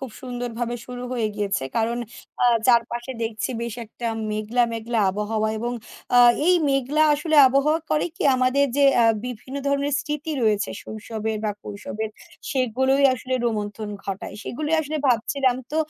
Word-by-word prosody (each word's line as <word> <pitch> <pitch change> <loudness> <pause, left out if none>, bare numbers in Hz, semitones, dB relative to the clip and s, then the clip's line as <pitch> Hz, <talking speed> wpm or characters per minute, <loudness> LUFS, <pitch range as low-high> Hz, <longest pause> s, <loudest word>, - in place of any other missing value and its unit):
খুব 265 -3 -6
সুন্দরভাবে 245 -1 -4
শুরু 250 0 -7
হয়ে 235 -3 0
গিয়েছে। 200 -6 -1
কারণ 230 +1 0 0.4
আ - - +5 0.2
চারপাশে 240 +1 +2
দেখছি 225 +2 -2
বেশ 235 -2 -4
একটা 235 +2 -7 0.2
মেঘলা, 215 +3 0
মেঘলা 230 +1 -2
আবহাওয়া 215 +2 -1
এবং 240 +2 -2 0.4
আ - - +6 0.3
এই 365 - +6 0.2
মেঘলা 275 +3 +2
আসলে 310 +2 0
আবহাওয়া 285 +5 +2
করে 300 - +2
কি? - - -4
আমাদের 255 +2 +3
যে 285 - +4
অ্যা 235 - +5 0.2
বিভিন্ন 250 +3 -7
ধরনের 280 +1 0
স্মৃতি 300 +1 -4
রয়েছে 210 -2 +1
শৈশবের 220 0 -4
বা 210 - +1
কৈশোরের 210 +1 -5 0.4
সেগুলোই 265 +2 +1
আসলে 255 +1 -4
রোমন্থন 210 -1 -3 0.2
ঘটায়। 195 0 -5
সেগুলোই 305 +5 -2
আসলে 310 0 -3
ভাবছিলাম 255 +2 +2
তো 305 - -2
240 Hz, 150 wpm, -23 LUFS, 220-275 Hz, 0.4 s, আ